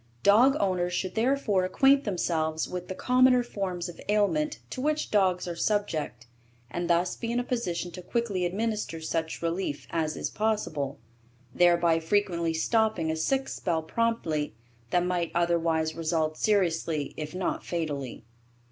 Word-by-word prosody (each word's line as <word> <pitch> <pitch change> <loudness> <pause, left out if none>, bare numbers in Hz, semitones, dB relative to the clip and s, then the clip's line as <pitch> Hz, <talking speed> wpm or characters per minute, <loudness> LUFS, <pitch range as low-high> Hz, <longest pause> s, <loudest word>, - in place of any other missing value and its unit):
Dog 245 +8 +6
owners 180 -2 0
should 185 +1 -2
therefore 225 -5 +1
acquaint 270 +9 +4
themselves 160 -5 -1
with 180 0 -5
the 190 - -5
commoner 250 +2 +4
forms 190 -6 -3
of 175 - -10
ailment 215 +9 +1
to 255 - -4
which 305 +2 0
dogs 185 -3 +2
are 175 - -3
subject 170 - -1 0.5
and 175 +5 -3
thus 175 +1 +2
be 230 -1 -4
in 240 - +1
a - - 0
position 180 -9 -2
to 180 - -8
quickly 205 -2 -1
administer 210 -1 -2
such 160 +1 -3
relief 165 -3 -2
as 160 -2 -1
is - - -3
possible, 205 -11 -1 0.6
thereby 170 -2 +4
frequently 170 -1 +1
stopping 180 0 +1
a - - -1
sick 265 +12 0
spell 165 -3 -2
promptly 160 - -1 0.3
that 175 +5 +2
might 175 -2 0
otherwise 165 -2 +1
result 160 -1 -1
seriously 165 -7 0
if 155 +2 -6
not 185 0 -2
fatally. 145 -9 -4
180 Hz, 145 wpm, -28 LUFS, 165-215 Hz, 0.6 s, Dog